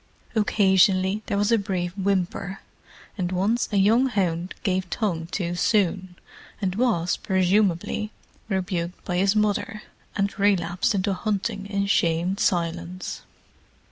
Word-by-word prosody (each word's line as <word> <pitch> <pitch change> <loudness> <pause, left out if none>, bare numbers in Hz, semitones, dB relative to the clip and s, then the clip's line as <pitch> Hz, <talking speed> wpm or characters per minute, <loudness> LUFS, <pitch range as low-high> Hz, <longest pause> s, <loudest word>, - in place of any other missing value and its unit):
Occasionally 195 -2 +3
there 200 - -1
was 205 +2 +2
a 230 - +4
brief 185 -3 -3
whimper, 190 -1 -1 0.6
and 180 -1 -1
once 200 +6 +1
a 205 - +1
young 225 +7 +4
hound 185 -6 -1
gave 185 -2 0
tongue 170 -7 -2
too 175 -1 -2
soon, 185 -1 +1 0.4
and 190 -3 -1
was, 200 -6 +1
presumably, 190 +2 +1 0.4
rebuked 180 -3 -2
by 180 -2 -1
his 195 +3 +3
mother, 210 0 0 0.3
and 200 0 -1
relapsed 195 +2 +2
into 195 +1 0
hunting 200 +1 -2
in 200 -1 -1
shamed 175 0 +1
silence. 175 0 -1
195 Hz, 125 wpm, -24 LUFS, 180-205 Hz, 0.6 s, a